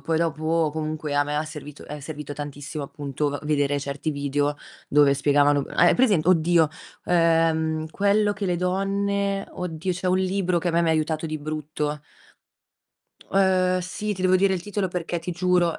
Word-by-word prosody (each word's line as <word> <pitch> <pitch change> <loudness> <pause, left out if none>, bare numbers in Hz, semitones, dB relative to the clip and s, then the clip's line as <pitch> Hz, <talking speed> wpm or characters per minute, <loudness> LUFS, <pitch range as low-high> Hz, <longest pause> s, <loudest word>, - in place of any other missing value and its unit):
poi 165 - -1
dopo 160 0 0
comunque 155 -1 -3
a 145 - +4
me 145 +1 -3
ha 150 - 0
servito 150 -1 -9
è 150 0 -7
servito 145 0 -7
tantissimo 145 +1 -6
appunto 145 0 -3
v 145 - -3
vedere 145 -1 +1
certi 140 +2 -3
video 145 0 -1 0.3
dove 145 -1 +5
spiegavano 145 0 +3
hai - - +5
present 205 -11 +3
oddio, 170 -2 +4 0.4
uhm, 160 -2 +2
"Quello 205 +3 +2
che 200 0 -4
le 180 -1 0
donne" 195 +2 -1
oddio 180 0 -3
c'è 180 +1 -4
un 180 0 +3
libro 185 -1 0
che 175 - -2
a - - +2
me 170 +1 +2
mi 170 - +1
aiutato 160 0 0
di 155 0 -3
brutto. 150 0 -4 1.3
Uhm, 185 -1 +3
sì, 210 +4 -3
ti 185 - -6
devo 185 0 +4
dire 190 +1 +3
il 180 - -4
titolo 205 -1 -2
perché 175 -1 -3
ti 170 +2 -5
giuro 175 -1 +1
160 Hz, 175 wpm, -24 LUFS, 150-185 Hz, 1.3 s, dove